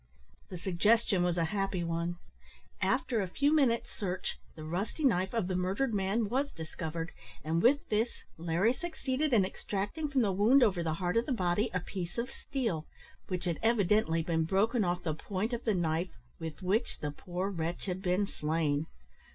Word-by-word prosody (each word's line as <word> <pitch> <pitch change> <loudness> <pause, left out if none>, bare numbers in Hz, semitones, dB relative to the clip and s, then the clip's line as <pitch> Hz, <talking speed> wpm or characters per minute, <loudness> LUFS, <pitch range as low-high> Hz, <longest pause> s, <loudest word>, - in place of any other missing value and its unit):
The 185 - -6
suggestion 195 +3 +3
was 175 0 +1
a 165 - +2
happy 195 -3 0
one. 170 +1 -1 0.6
After 230 -4 +1
a 190 - -1
few 285 - +2
minutes' 250 -6 +2
search 185 -2 -3 0.2
the 155 - -8
rusty 185 - -3
knife 190 -7 +3
of 230 -5 0
the 185 - -1
murdered 195 +8 0
man 205 +3 +1
was 270 +6 0
discovered, 165 +1 -5 0.3
and 160 +2 +1
with 280 +7 +4
this 220 +3 +2 0.3
Larry 170 +8 +2
succeeded 300 -2 -2
in 210 -6 +5
extracting 205 +10 -3
from 275 -2 +2
the 205 -4 +2
wound 225 +8 +5
over 195 -6 +3
the 160 -2 -1
heart 180 +3 0
of 230 - +2
the - - -1
body 205 0 +1
a 180 - 0
piece 180 0 -5
of 240 +3 -2
steel, 225 - -3 0.4
which 180 -1 -3
had 170 -3 -1
evidently 210 -7 +3
been 160 -1 +1
broken 210 +7 +2
off 180 0 0
the 160 - 0
point 195 +8 -3
of 240 - -3
the 215 -4 +2
knife, 170 0 -1 0.2
with 160 0 -6
which 210 +6 +1
the 150 - -3
poor 180 +6 -3
wretch 170 -1 -3
had 185 -1 -3
been 185 +2 +2
slain. 155 -3 0
190 Hz, 185 wpm, -32 LUFS, 170-230 Hz, 0.6 s, in